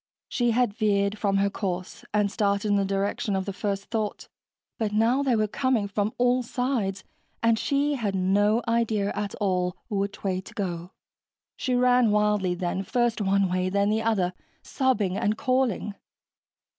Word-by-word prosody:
She 240 -2 0
had 235 -2 +2
veered 205 -1 +1
from 195 -2 +1
her 200 0 +2
course 185 -2 -4
and 205 -1 +1
started 200 -1 0
in 205 - +3
the 200 - +2
direction 195 +1 -1
of 190 -1 -1
the 200 - -4
first 200 0 -3
thought, 215 -3 -3 0.5
but 220 -2 0
now 225 +6 +2
they 265 -4 +2
were 215 -1 +2
coming 245 -2 0
from 205 +1 -1
all 245 +1 +3
sides 235 -6 -2 0.4
and 230 -1 +3
she 285 +1 +1
had 215 -8 -2
no 205 +5 +2
idea 225 -3 +1
at 205 -1 -3
all 180 -3 0
which 200 -2 -3
way 185 -2 -1
to - - -14
go. 175 -3 -3 0.7
She 255 -2 -1
ran 250 -1 +4
wildly 210 -3 +2
then, 175 +1 -2
first 240 +2 0
one 195 0 +2
way, 185 0 0
then 200 +2 +1
the 220 +1 +1
other, 200 -5 +1 0.3
sobbing 215 -9 0
and 210 0 0
calling. 255 -6 0
205 Hz, 170 wpm, -26 LUFS, 195-230 Hz, 0.7 s, ran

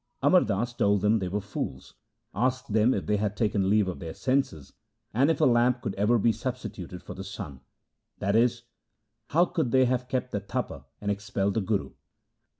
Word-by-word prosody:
Amar - - +6
Das 120 +5 -1
told 100 -4 +2
them 105 +2 +3
they 95 - -2
were 100 +3 -1
fools, 105 +1 -6 0.4
asked 125 +1 -1
them 110 +3 +4
if 95 -9 -1
they 105 +5 +1
had 105 0 -2
taken 105 -4 +1
leave 105 -1 +3
of 95 - -4
their 80 -2 -6
senses, 130 - -1 0.4
and 135 +7 +3
if 160 - +1
a - - +5
lamp 120 0 +3
could 100 - -2
ever 105 +5 +3
be 115 +1 +3
substituted 110 -7 -6
for - - -7
the 95 - -7
sun; 85 - -7 0.6
that 100 +2 0
is, 120 +1 +3 0.6
how 170 +4 +4
could 160 -7 -1
they 130 +1 +4
have 125 0 0
kept 125 -1 -2
the 100 - -1
Tapa 100 - -4 0.2
and 105 0 0
expelled 100 0 -1
the 110 - 0
Guru 100 +1 -1
105 Hz, 195 wpm, -27 LUFS, 100-125 Hz, 0.6 s, Amar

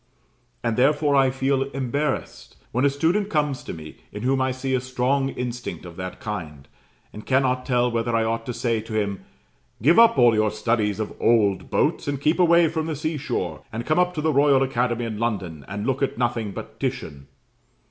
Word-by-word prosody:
And 115 -2 0
therefore 145 +2 +3
I 135 -1 +5
feel 135 +1 0
embarrassed 135 +1 -3
when 125 +4 +1
a - - +5
student 170 +9 0
comes 150 -6 0
to - - -6
me, 80 -1 -9
in 105 - -7
whom 130 +1 +1
I 130 - +1
see 130 +1 -3
a 130 - +1
strong 130 +2 0
instinct 125 -6 -5
of 85 -1 -10
that 90 0 -6
kind: 80 -10 -6 0.5
and 105 - -9
cannot 130 -1 +1
tell 125 -1 +2
whether 115 0 -1
I 115 - +2
ought 115 0 -2
to - - -1
say 115 -3 0
to 110 0 -2
him, 100 -2 -3 0.6
"Give 155 - +5
up 230 -9 +6
all 120 -2 +6
your 110 0 +2
studies 110 -1 0
of 110 - -3
old 105 -4 +2
boats, - - 0
and 140 -1 -1
keep 155 +5 +1
away 170 -1 +5
from 160 0 -2
the 160 - -2
sea 155 +2 -2
shore, 145 - -3
and 115 +1 -5
come 155 +3 +2
up 180 0 +2
to 155 - -2
the 155 0 +1
Royal 140 -1 +4
Academy 120 -2 0
in 110 -2 -5
London, 95 - -3
and 105 +2 -4
look 135 0 -1
at 135 - -1
nothing 120 -3 -1
but - - -9
Titian." 70 -1 -4
125 Hz, 205 wpm, -23 LUFS, 110-140 Hz, 0.6 s, up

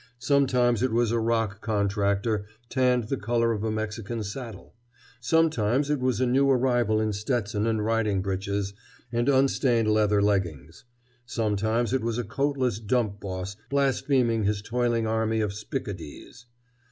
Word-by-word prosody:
Sometimes 125 -3 +2
it 130 -1 +1
was 115 0 +2
a 115 - +1
rock 115 -3 0
contractor 100 0 0 0.2
tanned 125 -2 +2
the 125 +5 -3
color 115 +1 +1
of 105 -2 -2
a 110 - 0
Mexican 110 +1 -3
saddle. 110 0 -8 0.5
Sometimes 140 -2 +2
it 150 - +1
was 125 -3 0
a 130 - +2
new 135 +3 +3
arrival 120 -4 +2
in 110 -1 0
Stetson 105 0 -1
and 110 -2 0
riding 105 -4 +1
breeches 100 +1 -2 0.4
and 120 +2 +1
unstained 130 -4 +2
leather 105 -1 +3
leggings. 90 - -1 0.4
Sometimes 110 +2 0
it 130 - +1
was 115 0 -2
a 120 - -1
coatless 130 -5 -1
dump 110 -2 -1
boss 95 0 -5
blaspheming 135 -4 +1
his 100 0 0
toiling 120 0 0
army 110 0 0
of 105 -2 -1
spick 110 +6 -5
a 100 - -3
dees. 95 +7 -11
115 Hz, 155 wpm, -26 LUFS, 105-125 Hz, 0.5 s, new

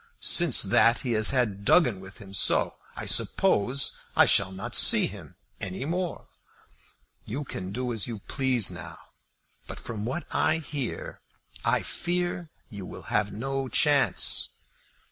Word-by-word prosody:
Since 170 -7 +3
that 115 +4 +3
he 125 - -3
has 110 -1 +4
had 110 -7 0
Duggin 120 - +4
with 95 +1 -12
him; 100 -2 -12
so, - - +3 0.2
I - - -6
suppose, 125 +7 +2 0.2
I - - +7
shall 95 -1 +3
not 95 0 -7
see - - +5
him - - -9 0.2
any 95 +7 -4
more. 175 +2 -3 1.0
You 135 +7 -4
can 95 -8 -6
do 125 +2 -3
as 110 -4 -2
you 115 -2 -5
please 125 -1 0
now; 85 -1 -8 0.7
but, - - -8
from 110 -3 -6
what 130 +10 -3
I 155 - +2
hear, 145 -5 -6 0.4
I - - +1
fear 175 -1 -2 0.2
you 100 -2 -7
will 115 - -9
have 105 -1 +1
no 135 +4 -3
chance." 145 0 +2
120 Hz, 145 wpm, -27 LUFS, 100-140 Hz, 1.0 s, I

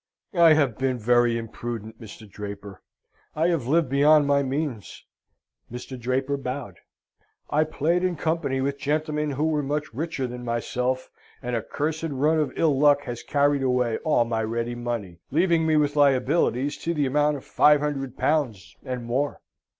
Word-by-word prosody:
"I 170 -3 +6
have 140 -8 +1
been 130 -1 0
very 120 +1 +3
imprudent, 115 -1 -6
Mr. 110 0 -11
Draper. 100 -2 -8 0.5
I 160 +3 +2
have 160 -9 -1
lived 160 +2 +3
beyond 145 +2 +5
my 140 0 +3
means." 135 -5 -4 0.7
(Mr. 125 +2 -7
Draper 130 +3 -1
bowed.) 125 -8 -6 0.7
"I 155 +2 +3
played 165 +3 0
in 180 -1 0
company 155 -4 -1
with 140 +1 -2
gentlemen 150 +1 -1
who 145 +1 -2
were 155 -2 +1
much 145 0 -3
richer 145 0 -3
than 125 0 -6
myself, 125 +2 -2 0.3
and 125 -2 -3
a 115 - 0
cursed 160 +7 -3
run 150 +3 +1
of 150 -4 0
ill 150 -5 +2
luck 145 -1 +4
has 120 -3 -6
carried 145 -1 +1
away 125 -3 +1
all 150 -7 +2
my 115 -1 -1
ready 115 +2 -2
money, 120 -8 -5
leaving 165 +1 +2
me 155 - +3
with 145 -1 +2
liabilities 140 0 +2
to 170 0 -3
the 145 -2 +1
amount 145 +2 +1
of 135 - -12
five 150 0 +4
hundred 135 -3 -3
pounds, 115 - -1
and 125 -2 -5
more." 135 +5 -1
140 Hz, 165 wpm, -25 LUFS, 120-150 Hz, 0.7 s, I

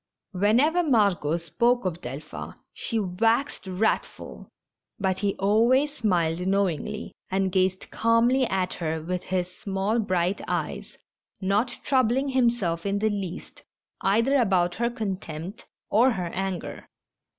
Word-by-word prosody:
203 200 +1 +1
Whenever 310 +8 +3
Margot 195 - +2
spoke 235 +7 +1
of 175 -2 -2
Delphin 140 +5 -7 0.2
she 230 - -2
waxed 225 +5 0
wrath 190 +4 +1
ful, - - -11 0.5
but 190 -2 0
he 200 -1 0
always 240 +9 +3
smiled 180 -5 0
knowingly, 200 +2 -1 0.2
and 190 0 0
gazed 185 0 0
calmly 235 +3 +3
at 185 -2 -1
her 160 -1 -2
with 180 +2 -2
his 180 -1 -2
small, 200 +3 -1
bright 185 -2 0
eyes, - - -3 0.4
not 210 +6 0
troubling 260 +1 +2
himself 235 -10 +1
in 200 0 0
the 215 +1 +1
least 195 -4 -6 0.4
either 230 +8 +3
about 185 -7 +2
her 235 0 0
contempt 190 -5 -5 0.2
or 235 +5 +5
her 180 -4 -3
anger. 190 -2 -4
200 Hz, 130 wpm, -26 LUFS, 180-230 Hz, 0.5 s, or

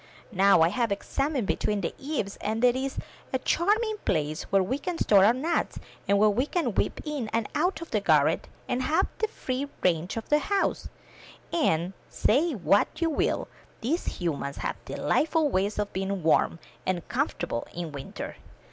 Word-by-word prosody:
Now 195 -4 +5
I 165 - +4
have 235 +2 0
examined 275 +4 -1
between 205 +1 0
the 170 - -2
eaves, 270 -9 -3
and 220 +3 -2
there 245 0 +5
is 265 +1 -3 0.3
a 260 - +2
charming 425 - +1
place 155 -1 -1
where 195 -1 +4
we 260 +9 -2
can 350 +3 -3
store 200 -9 +5
our 210 - +7
nuts, 300 +8 -1 0.3
and 200 - +4
where 215 +1 +5
we 250 +7 0
can 350 0 0
whip - - 0
in 295 -7 -3
and 225 0 -1
out 355 +3 0
of 335 - -8
the 215 - +2
garret, 160 -5 +3 0.2
and 250 - 0
have 305 +5 +2
the 440 - +2
free 270 -9 -3 0.2
range 175 +3 +1
of 225 - -4
the 295 - +5
house; 395 +6 0 0.6
and, 180 - +1 0.2
say 300 +8 +2
what 200 -2 +3
you 330 -1 +1
will, - - 0 0.3
these 295 +10 -1
humans 145 -5 -2
have - - -4
delightful 315 -1 +1
ways 200 -2 0
of 210 -1 -2
being 195 -1 -2
warm 165 +1 +3 0.3
and 180 -3 -2
comfortable 215 - -2
in 170 -2 -5
winter." 140 -2 -7
225 Hz, 175 wpm, -27 LUFS, 185-295 Hz, 0.6 s, our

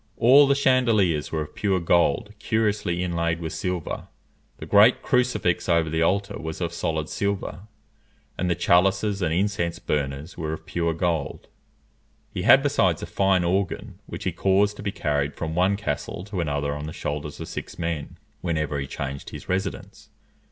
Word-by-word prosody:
All 140 +5 +7
the 140 - +4
chandeliers 115 - +2
were 80 -1 -1
of 75 - -12
pure 95 -3 0
gold 85 +3 +2
curiously 105 -5 0
inlaid 85 -1 -1
with 80 -1 -5
silver. 90 -3 -3 0.5
The - - -8
great 105 +4 +5
crucifix 120 -10 +1
over 85 -2 +2
the 80 0 0
altar 100 +4 0
was 80 -1 -5
of 85 -1 -2
solid 80 -2 -2
silver, 100 0 -3 0.7
and 90 - -1
the 85 - +2
chalices 95 +5 +2
and 85 -3 +1
incense 85 -1 0
burners 70 +2 -3
were 80 -2 -3
of 80 - -8
pure 85 -1 -1
gold. 80 -4 -2 0.8
He - - -3
had - - +6
besides - - +2
a - - -2
fine 95 -2 +2
organ, 95 +2 -1
which - - -7
he - - 0
caused 100 +2 +2
to - - -7
be 100 -1 -2
carried 75 -4 -1
from 80 -1 -4
one 95 +4 +2
castle 100 -3 -4
to 100 -3 -3
another 70 -2 -1
on 75 +1 -5
the 80 - -6
shoulders 75 0 -4
of - - -6
six - - -7
men, 85 -3 -4 0.2
whenever 75 -4 -1
he 70 - -4
changed 70 0 -5
his - - -9
residence. 95 +2 -4
85 Hz, 175 wpm, -24 LUFS, 80-100 Hz, 0.8 s, All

